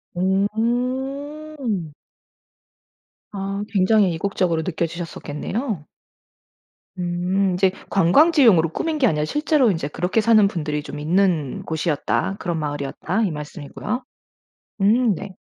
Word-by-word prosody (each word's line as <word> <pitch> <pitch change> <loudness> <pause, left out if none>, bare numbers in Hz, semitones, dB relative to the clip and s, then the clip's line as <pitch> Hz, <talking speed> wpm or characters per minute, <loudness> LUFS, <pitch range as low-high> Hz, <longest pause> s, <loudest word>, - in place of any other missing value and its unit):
음. 245 - -1 1.4
아 195 0 -3
굉장히 195 -1 +3
이국적으로 170 -1 0
느껴지셨었겠네요. 170 - -4 1.1
음 180 +2 0
인제 185 +1 +3 0.2
"관광지용으로 205 - +5
꾸민 310 - -2
게 255 - +4
아니라 150 -5 +1
실제로 295 - +2
인제 160 -5 -2
그렇게 180 +8 0
사는 215 -2 +5
분들이 150 -5 -3
좀 150 - -7
있는 165 -3 +1
곳이었다. 160 +3 -1
그런 170 -3 -2
마을이었다." 150 +7 -2
이 195 - 0
말씀이고요. 150 - -5 0.8
음 225 +2 +4
네. 195 +1 -8
190 Hz, 265 characters per minute, -22 LUFS, 165-230 Hz, 1.4 s, 관광지용으로